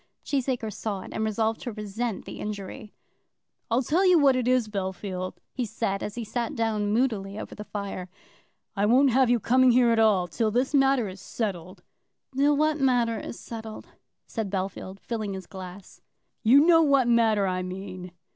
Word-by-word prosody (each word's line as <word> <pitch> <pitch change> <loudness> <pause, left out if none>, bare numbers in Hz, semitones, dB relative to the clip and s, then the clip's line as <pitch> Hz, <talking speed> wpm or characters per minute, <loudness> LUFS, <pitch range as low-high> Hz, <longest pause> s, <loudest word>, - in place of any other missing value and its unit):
Cheesacre 250 -5 -1
saw 200 -2 -4
it, - - -10
and 220 - -2
resolved 220 +1 0
to 240 - -4
resent 215 +1 -4
the - - -8
injury. 210 0 -6 0.8
"I'll 235 +3 +2
tell 325 +9 +2
you 365 -2 +6
what 280 -4 +5
it 250 -1 -1
is, 250 -3 +3
Bellfield," 190 -2 -4 0.2
he 255 - -2
said, 215 -3 -2
as 210 - -5
he 240 - -4
sat 240 +6 -3
down 215 -3 0
moodily 215 -4 0
over - - -7
the 210 - -8
fire, 200 -3 -5 0.7
"I 200 0 +1
won't 260 +4 +5
have 260 0 +3
you 240 -1 +3
coming 255 +4 +4
here 240 -1 +5
at 230 - +2
all, 205 -5 +3
till 220 +6 0
this 250 +6 0
matter 270 -4 +3
is 185 -1 -9
settled." 185 -4 -5 0.5
"Till 285 +2 +3
what 310 +1 +1
matter 245 -4 +2
is - - -7
settled?" 220 -1 -8 0.4
said 220 -4 -4
Bellfield, 190 0 -4
filling 215 -4 -4
his 190 - -7
glass. 190 0 -11 0.4
"You 250 +5 +6
know 330 -1 +6
what 275 -5 +3
matter 225 -4 +3
I 185 -1 -1
mean." 185 0 -7
220 Hz, 180 wpm, -26 LUFS, 195-250 Hz, 0.8 s, you